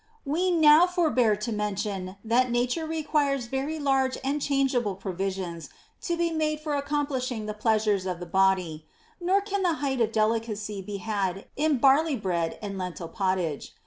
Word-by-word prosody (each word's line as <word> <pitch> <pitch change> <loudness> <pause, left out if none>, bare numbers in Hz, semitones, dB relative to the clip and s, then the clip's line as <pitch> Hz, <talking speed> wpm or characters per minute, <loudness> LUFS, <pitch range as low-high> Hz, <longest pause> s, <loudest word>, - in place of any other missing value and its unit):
16. 280 - -3
We 365 +3 +2
will 325 - +1
now 310 +3 +8
forbear 305 - +2
to 210 +3 -4
mention 205 -3 -3
that 245 +3 +3
Nature 250 +7 0
requires 295 -4 0
very 270 +6 -3
large 270 -3 +1
and 285 +2 -1
chargeable 265 -8 +1
provisions 185 -3 -4 0.3
to 340 -1 -2
be 340 0 +1
made 305 -1 0
for 305 -1 -3
ac 280 0 -3
complishing 260 -6 -2
the 210 - -3
pleasures 210 -3 +1
of 180 -2 -3
the 175 - -6
body; 180 -4 +1 0.3
nor 370 +3 +2
can 400 -1 -2
the 355 -3 +2
height 275 -5 -1
of 225 -1 +2
delicacy 215 -2 -1
be 200 +1 -6
had 195 -2 -2
in 300 -1 +2
barley 280 +4 +4
bread 175 -7 -2
and 195 -2 -4
lentil 180 -2 -5
pottage. 185 -5 -2
235 Hz, 175 wpm, -27 LUFS, 195-295 Hz, 0.3 s, now